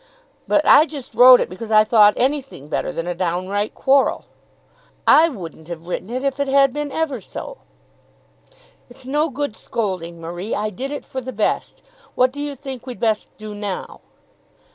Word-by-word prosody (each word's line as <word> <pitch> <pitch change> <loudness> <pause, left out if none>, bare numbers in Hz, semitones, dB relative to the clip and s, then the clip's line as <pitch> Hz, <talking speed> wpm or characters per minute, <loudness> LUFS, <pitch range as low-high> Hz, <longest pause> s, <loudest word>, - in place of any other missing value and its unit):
But 305 - +2
I 310 - +7
just 280 -4 -9
wrote 250 0 +8
it - - -1
because 200 +5 -8
I 215 -1 +6
thought 210 -1 +5
anything 265 - -2
better - - -2
than 165 - -4
a 175 - -2
downright 185 +4 -2
quarrel." 270 +1 +2 0.8
"I 325 +2 +6
wouldn't 165 - -9
have 170 -1 -8
written 180 +3 -5
it, 255 +2 -3
if 275 0 -1
it 280 - 0
had 275 -1 +4
been 295 -1 -3
ever 290 -7 -2
so." - - -8 1.3
"It's 250 +1 -14
no 295 +4 0
good 280 -4 -4
scolding, 180 -9 -4
Marie. 175 +6 -5
I 210 +1 -2
did 260 +8 -5
it 290 - -6
for 260 - -5
the 260 +1 -6
best. 215 -3 -2 0.3
What 255 0 +3
do 285 +2 -7
you 290 -1 -4
think 265 -2 -8
we'd 250 - -7
best 220 -2 0
do 215 -1 -8
now?" 205 -2 -6
245 Hz, 180 wpm, -20 LUFS, 195-275 Hz, 1.3 s, wrote